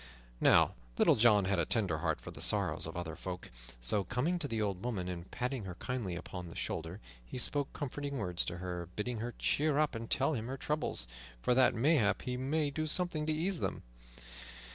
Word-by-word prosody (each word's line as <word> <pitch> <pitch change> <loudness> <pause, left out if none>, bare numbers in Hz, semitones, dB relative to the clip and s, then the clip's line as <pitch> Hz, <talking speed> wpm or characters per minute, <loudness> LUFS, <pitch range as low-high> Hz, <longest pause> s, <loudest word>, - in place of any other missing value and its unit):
Now - - +5 0.2
Little - - +6
John 105 -3 +5
had 95 -1 +1
a 85 - +2
tender 95 -8 +1
heart - - 0
for - - -8
the - - -8
sorrows - - +2
of 80 +2 -6
other 80 -2 -4
folk, 90 -4 -6 0.3
so, - - +3
coming 140 - 0
to 150 - -1
the 115 -4 -2
old 100 -3 -1
woman 105 -7 -2
and 90 -1 -5
patting 125 -3 -3
her 90 -2 -6
kindly 115 -5 -3
upon 90 0 -6
the - - -10
shoulder, 80 +5 -3 0.2
he - - -7
spoke 145 +2 +3
comforting 145 0 -4
words 90 -6 0
to 85 - -4
her, 90 -1 -5
bidding 115 +2 -2
her 120 +2 -4
cheer 150 -1 +2
up 150 -2 +2
and 115 -1 -5
tell 135 +4 +2
him 115 -4 -3
her 135 +1 -4
troubles, 150 - -2 0.3
for 125 - +2
that 130 -1 +5
mayhap 115 - +3
he 125 - -2
might 145 +3 0
do 155 +1 -1
something 160 -2 +1
to - - +2
ease 170 +3 0
them. - - -2
115 Hz, 210 wpm, -33 LUFS, 90-140 Hz, 0.3 s, Little